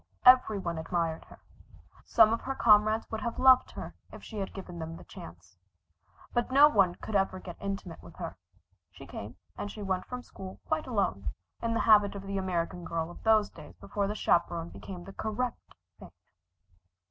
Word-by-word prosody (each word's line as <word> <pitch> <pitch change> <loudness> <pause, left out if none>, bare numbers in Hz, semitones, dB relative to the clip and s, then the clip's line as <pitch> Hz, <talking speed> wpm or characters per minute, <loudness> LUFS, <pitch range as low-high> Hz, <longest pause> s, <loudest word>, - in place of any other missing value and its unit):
Every 250 -4 +7
one 170 -4 -3
admired 165 -1 -2
her. - - -15 0.7
Some 220 -1 +5
of 230 - -2
her 270 +1 -3
comrades 215 -1 +4
would 220 -1 -3
have 235 +1 -3
loved 260 -1 +6
her - - -7 0.2
if - - -11
she 220 - -7
had 195 - -3
given 180 -3 -8
them 165 +1 -6
the - - -12
chance. 85 +2 -13 0.7
But 240 - 0
no 280 +3 +8
one 195 -10 +3
could 220 - -6
ever 195 -1 +1
get 175 -2 -9
intimate 195 -4 -5
with - - -14
her. - - -6 0.5
She - - -13
came 105 +4 -8 0.2
and 205 - -4 0.2
went 185 -1 -1
from 250 0 -6
school 190 -5 -10
quite 315 -2 -1
alone, 100 - -1 0.3
in 230 0 -1
the - - +1
habit 210 -2 +5
of 200 - -6
the 195 0 -3
American 175 -2 -2
girl 165 0 -3
of - - -13
those 220 -2 +3
days - - -13
before 200 -1 -2
the 210 - -3
chaperon 170 -3 +1
became 180 -1 -9
the 195 - -10
correct 230 +3 -4 0.2
thing. - - -11
195 Hz, 185 wpm, -30 LUFS, 175-220 Hz, 0.7 s, no